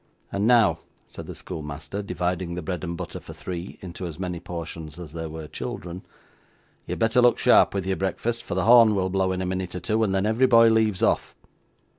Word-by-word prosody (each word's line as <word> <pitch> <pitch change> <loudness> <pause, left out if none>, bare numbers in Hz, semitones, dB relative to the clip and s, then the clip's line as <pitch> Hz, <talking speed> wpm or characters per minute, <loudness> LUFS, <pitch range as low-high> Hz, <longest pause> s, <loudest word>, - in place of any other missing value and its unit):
'And 100 +2 0
now,' 115 -4 +4 0.3
said - - -9
the - - -7
schoolmaster, 75 +5 -6
dividing 90 -3 -2
the 90 - -5
bread 90 -1 -4
and 85 -1 -4
butter - - -6
for - - -11
three 90 0 -7
into 90 0 -6
as 80 - -8
many 90 -2 -4
portions 85 -2 -7
as 85 -4 -9
there 80 -1 -5
were 80 0 -7
children, 85 +3 -6 0.8
'you - - -3
had - - -4
better 115 +2 +3
look 120 0 +5
sharp - - +5
with 95 -2 -1
your 95 0 -1
breakfast, 115 +5 -2
for - - -4
the 95 0 0
horn 115 -2 +7
will 95 -1 0
blow 95 0 +1
in 95 0 -2
a - - -2
minute 90 -1 -3
or - - -3
two, 110 +5 0
and 95 -3 +1
then 95 +1 +1
every 115 +5 +3
boy 115 -2 +7
leaves 110 -4 +2
off. - - +1
95 Hz, 220 wpm, -25 LUFS, 85-105 Hz, 0.8 s, horn